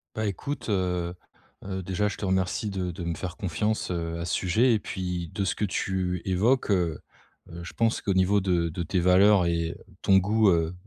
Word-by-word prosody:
Bah 110 0 -1
écoute, 115 - -4
heu, 90 -3 0 0.5
heu, 95 -1 -4
déjà, 95 +3 0
je 105 - -4
te 100 - -4
remercie 95 +2 0
de 95 -2 -2
de 85 +1 -7
me 85 0 -2
faire 90 +2 -6
confiance, 105 +2 -1
heu, 85 -1 -3
à 85 - -3
ce - - -2
sujet 110 +7 +3
et 110 - +2
puis, 90 -4 -4
de 100 - -1
ce 85 - 0
que 105 - 0
tu 90 -2 -2
évoques, 105 +6 +2
heu, 85 -5 +1 0.5
heu, 85 - -8
je 85 - -9
pense 115 -1 +1
qu'au 100 - 0
niveau 95 +2 +3
de 85 -3 +1
de 85 +2 -4
tes 90 +3 0
valeurs 95 +1 +5
et 85 -1 -1 0.3
ton 95 -1 +5
goût, 105 +2 +3
heu, 85 -1 +1
95 Hz, 210 wpm, -26 LUFS, 85-100 Hz, 0.5 s, valeurs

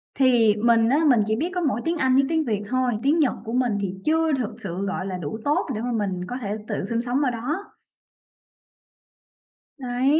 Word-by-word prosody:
thì 240 -5 +4
mình 230 +1 +3
á, 275 - +3
mình 245 - +5
chỉ 220 - +1
biết 320 +10 -1
có 360 - 0
mỗi 265 -8 0
tiếng 335 +1 0
Anh 260 -4 +2
với 275 - +5
tiếng 320 -1 +1
Việt 210 -3 -1
thôi, 255 -1 +1
tiếng 300 +4 +3
Nhật 290 -5 +3
của 225 - -5
mình 245 -4 +1
thì 190 -1 -3
chưa 320 0 +2
thực 255 -6 -2
sự, 190 +1 -4
gọi 195 -1 -3
là, 185 -2 -4
đủ 175 +6 -5
tốt 290 - +1
để 215 - -3
mà 245 - -2
mình 200 -5 -1
có 250 - -4
thể 210 -1 -3
tự - - -3
sinh 230 +3 -1
sống 245 +3 -1
ở 255 - +1
đó. 295 - -4 2.0
Đấy. 260 +3 +1
245 Hz, 220 wpm, -24 LUFS, 215-275 Hz, 2.0 s, mình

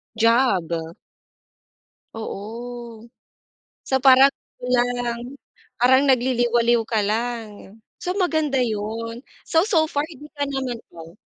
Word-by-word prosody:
Job. 230 -6 +3 1.4
Oo. 230 +2 -7 0.8
So, 265 -1 0
parang 270 +1 +7 0.3
kulang. 245 +1 -1 0.4
Parang 260 +2 +5
nagliliwaliw 240 -2 +2
ka 220 0 -1
lang. 220 -1 -3 0.2
So 360 +2 -3
maganda 315 -7 +1
yun. 230 0 -3 0.2
So 325 - +3
so 325 -7 +3
far 290 -2 -1
hindi 295 -3 -12
ka 285 -2 -3
naman, 265 -4 -3 0.2
oh 165 0 -10
240 Hz, 100 wpm, -22 LUFS, 230-265 Hz, 1.4 s, parang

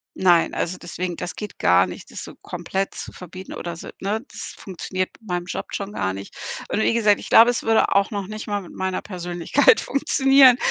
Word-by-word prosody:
Nein, 175 -3 +4
also 180 +2 -2
deswegen 175 0 -5
das 180 - -6
geht 210 - -7
gar 90 +1 +4
nicht, 90 - -10
das - - -7
so - - -10
komplett 195 +1 -3
zu - - -7
verbieten 185 +1 -9
oder 170 -1 -6
so, - - -9
ne? 210 +3 -1
Das - - -8
funktioniert 185 0 -4
mit 220 - -19
meinem 175 0 -2
Job 180 - -5
schon 200 +1 -4
gar 95 - -1
nicht. 100 +1 -9 0.3
Und 220 - 0
wie - - +2
gesagt, 210 -3 +3
ich - - -9
glaube, 230 +2 +8
es 245 - -1
würde 225 0 +3
auch 200 +2 +3
noch 200 -3 -3
nicht 215 +1 -6
mal 205 -1 -1
mit 180 - -12
meiner 190 0 -2
Persönlichkeit 180 - +2
funktionieren, 270 -2 +5
190 Hz, 215 wpm, -23 LUFS, 175-215 Hz, 0.3 s, glaube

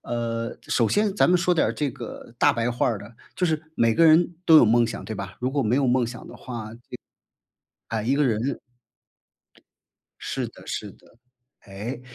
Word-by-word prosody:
呃， 115 -1 -3
首 115 - +1
先 205 -1 +1
咱 - - +3
们 180 - +4
说 180 +1 +2
点 165 - +2
儿 - - -1
这 145 -3 -2
个 120 0 -10
大 - - +5
白 115 +1 -1
话 120 - 0
儿 115 -4 0
的， 100 +2 -11 0.2
就 180 - 0
是 155 -2 0
每 115 -5 +2
个 165 - +4
人 165 +2 +5
都 160 - +7
有 - - +7
梦 120 +2 +4
想， 115 - -6
对 110 - -5
吧？ 100 0 -6
如 125 +1 -1
果 140 0 0
没 115 +3 +1
有 140 -1 +2
梦 125 -1 +2
想 120 +2 -9
的 - - -11
话， 115 -3 -7
就 - - -14 1.1
哎， 110 -1 -2
一 130 +5 +1
个 150 - +3
人 125 +2 0 1.6
是 - - -3
的 - - -16
是 - - -4
的。 115 - -23 0.4
哎， 105 +6 -7
120 Hz, 215 characters per minute, -24 LUFS, 115-145 Hz, 1.6 s, 都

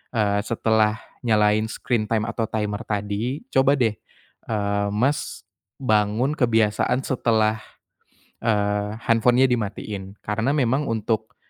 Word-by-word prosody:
eee, 105 -2 +2
setelah 110 -2 +2 0.3
nyalain 105 -1 +3
screen 120 -4 -1
time 110 -2 +1
atau 115 - -2
timer 105 -1 -2
tadi 105 +6 -2
coba 135 +1 +4
deh, 110 -4 +2 0.5
eee, 100 -2 0
Mas 130 +8 -1 0.4
bangun 110 +3 +2
kebiasaan 115 0 +2
setelah, 110 -4 +1 0.9
eee, 105 -1 0
handphone-nya 120 +3 +4
dimatiin. 105 -3 -4
Karena 115 +5 0
memang 135 +1 +1
untuk, 110 0 -2
110 Hz, 110 wpm, -23 LUFS, 105-120 Hz, 0.9 s, coba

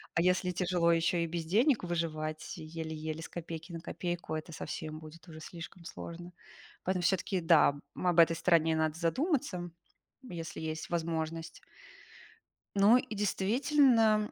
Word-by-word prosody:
А 165 - +3
если 180 +1 +2
тяжело 175 -1 +2
ещё 165 +1 +2
и 170 - +1
без 165 0 -3
денег 230 - +3
выживать 155 -3 -3
еле-еле 160 0 -5
с - - -6
копейки 165 0 -7
на 165 - -5
копейку, 175 -2 -4
это 155 +2 -5
совсем 155 0 -5
будет 160 +2 -13
уже 160 -2 -10
слишком 170 +2 -9
сложно. 175 +1 -8 0.5
Поэтому 185 -1 0
всё-таки, 190 +1 +1
да, 165 -3 +5 0.2
об 175 -2 +2
этой 165 0 +6
стороне 165 -1 +3
надо 160 -1 +1
задуматься, 185 - 0 0.5
если 170 -10 -7
есть 155 0 -4
возможность. 165 -1 -3 1.1
Ну, 205 +4 +7
и 255 -2 -3
действительно, 220 +2 +3
170 Hz, 140 wpm, -32 LUFS, 160-185 Hz, 1.1 s, Ну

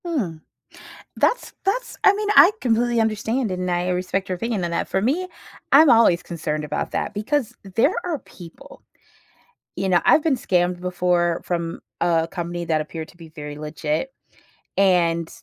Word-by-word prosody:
Mm. 205 - -3 0.7
That's - - 0
that's - - -1
I 400 - +7
mean, 415 +1 -3
I - - +9
completely 240 0 +1
understand, 220 +1 0
and 180 0 -2
I 175 +1 0
respect 185 +2 -1
your 185 - -2
opinion 220 -1 -2
on 170 - -2
that - - -1
For 190 - -1
me, 305 - 0 0.4
I'm 300 +2 +7
always 225 -8 +5
concerned 155 -2 -4
about 150 0 -3
that - - -2
because 240 +3 -2 0.2
there 275 +10 +3
are 345 -4 -2
people, 170 -7 -14 0.9
you 190 +1 -2
know 175 -2 +4
I've 310 - +5
been 300 -4 +2
scammed 180 -6 0
before 175 -1 0
from 170 -1 -3 0.2
a 165 -1 +2
company 175 -1 -4
that 155 -1 +1
appeared 160 +1 -6
to - - -18
be 165 -2 -12
very 150 -2 -8
legit 155 - -3 0.7
and 170 -4 +3
180 Hz, 165 wpm, -22 LUFS, 170-235 Hz, 0.9 s, I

